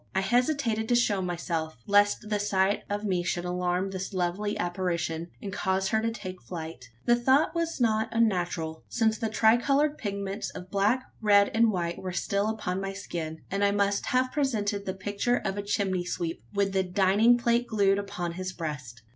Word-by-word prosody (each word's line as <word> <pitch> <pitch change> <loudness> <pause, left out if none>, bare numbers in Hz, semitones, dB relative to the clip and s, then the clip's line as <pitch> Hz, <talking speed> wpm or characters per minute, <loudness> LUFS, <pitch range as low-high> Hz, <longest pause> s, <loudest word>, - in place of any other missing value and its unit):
I 190 - +3
hesitated 240 0 +1
to 240 - +4
show 210 -5 +2
myself 170 -4 -3
lest 205 +1 +3
the 210 -1 0
sight 200 -1 +1
of 205 +1 -2
me 185 -4 0
should 175 0 -2
alarm 180 +1 -1
this 190 +1 -5
lovely 185 +4 -1
apparition, 175 -2 -2
and 195 -2 -5
cause 190 0 0
her 220 - +2
to 230 - 0
take 185 -5 -7
flight. 160 -7 -7 0.2
The 240 - +5
thought 260 +5 +3
was 335 -2 -2
not 220 -2 +2
unnatural 175 -8 0
since 220 -2 +1
the 225 -2 -1
tricoloured 275 +8 +3
pigments 200 -1 -3
of 180 +1 -9
black, 210 +6 +2 0.2
red, 205 -2 +5
and 225 +1 +4
white 170 -3 -2
were 185 -1 -4
still 200 +3 0
upon 195 -4 -2
my 195 0 -3
skin; 165 -5 -5
and 200 +1 0
I 200 - +5
must 200 0 +1
have 255 0 +2
presented 210 -8 -1
the 190 - -2
picture 205 +5 0
of 195 -1 -2
a 205 - -2
chimney 200 -3 0
sweep 170 -1 -3
with 200 -1 0
a 190 - +4
dining 195 +6 +4
plate 235 0 +1
glued 200 -2 +2
upon 180 -4 -4
his 185 +2 -5
breast. 145 - -6
200 Hz, 185 wpm, -28 LUFS, 180-220 Hz, 0.2 s, The